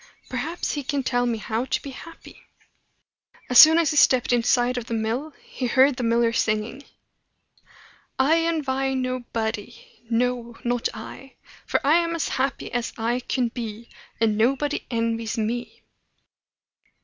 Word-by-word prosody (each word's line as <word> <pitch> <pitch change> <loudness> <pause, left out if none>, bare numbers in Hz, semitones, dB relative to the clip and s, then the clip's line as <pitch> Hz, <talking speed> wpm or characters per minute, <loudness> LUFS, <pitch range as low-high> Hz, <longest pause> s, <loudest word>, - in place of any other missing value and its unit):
"Perhaps 305 +7 -3
he 290 - -3
can 280 0 -2
tell 245 -1 0
me 235 -1 -1
how 220 +3 -3
to 265 - -1
be 275 - -8
happy." 330 +5 -13 1.1
As 250 - +7
soon 320 +1 +10
as 335 -3 +2
he 300 - -2
stepped 255 -3 +4
inside 245 +1 +2
of 245 -2 -4
the 230 - -2
mill, 230 +8 -2
he 255 - -4
heard 265 +2 +4
the - - -3
miller 230 0 +2
singing: 225 +4 -1 1.3
"I 300 +5 +3
envy 270 -5 -1
no 255 0 -2
body 220 -2 -5
no, 240 0 -1
not 240 -1 0
I! 245 +4 -10 0.3
For - - +1
I 300 +4 +5
am 335 -1 0
as 330 - -2
happy 265 +1 -2
as 240 -1 -2
I 235 +2 0
can 250 -1 -1
be; 230 -1 -7 0.3
And 220 -2 +1
nobody 275 +5 0
envies 230 -1 -2
me." 235 +2 -3
245 Hz, 150 wpm, -24 LUFS, 230-270 Hz, 1.3 s, soon